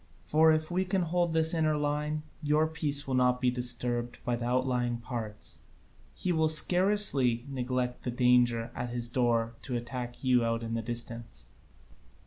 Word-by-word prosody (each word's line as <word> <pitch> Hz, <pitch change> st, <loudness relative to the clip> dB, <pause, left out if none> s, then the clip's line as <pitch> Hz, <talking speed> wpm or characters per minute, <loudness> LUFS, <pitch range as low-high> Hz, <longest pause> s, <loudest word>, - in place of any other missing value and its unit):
For, 160 Hz, +1 st, +4 dB
if 155 Hz, +1 st, 0 dB
we 185 Hz, +2 st, +1 dB
can 190 Hz, 0 st, 0 dB
hold 170 Hz, 0 st, 0 dB
his 160 Hz, +1 st, +3 dB
inner 155 Hz, -2 st, +1 dB
line, 150 Hz, +1 st, -2 dB, 0.2 s
your 150 Hz, +1 st, +2 dB
peace 150 Hz, -3 st, 0 dB
will 135 Hz, -, -2 dB
not 125 Hz, 0 st, +2 dB
be 125 Hz, -1 st, +2 dB
disturbed 120 Hz, -1 st, -2 dB
in 120 Hz, -1 st, 0 dB
the 120 Hz, -, -4 dB
outlying 125 Hz, -1 st, 0 dB
parts: 115 Hz, -3 st, -5 dB, 0.6 s
he 185 Hz, -, -1 dB
will 160 Hz, -2 st, +2 dB
scarcely 155 Hz, -, +2 dB
neglect 125 Hz, -2 st, -2 dB
the -, -, -4 dB
danger 120 Hz, -1 st, +2 dB
at 120 Hz, -, -4 dB
his 120 Hz, -1 st, -2 dB
door 115 Hz, -2 st, +1 dB
to 125 Hz, -3 st, -3 dB
attack 120 Hz, +1 st, -6 dB
you 125 Hz, -2 st, +3 dB
out 115 Hz, 0 st, -1 dB
in 115 Hz, 0 st, -4 dB
the 115 Hz, -, -1 dB
distance." 115 Hz, 0 st, -2 dB
125 Hz, 165 wpm, -29 LUFS, 120-155 Hz, 0.6 s, For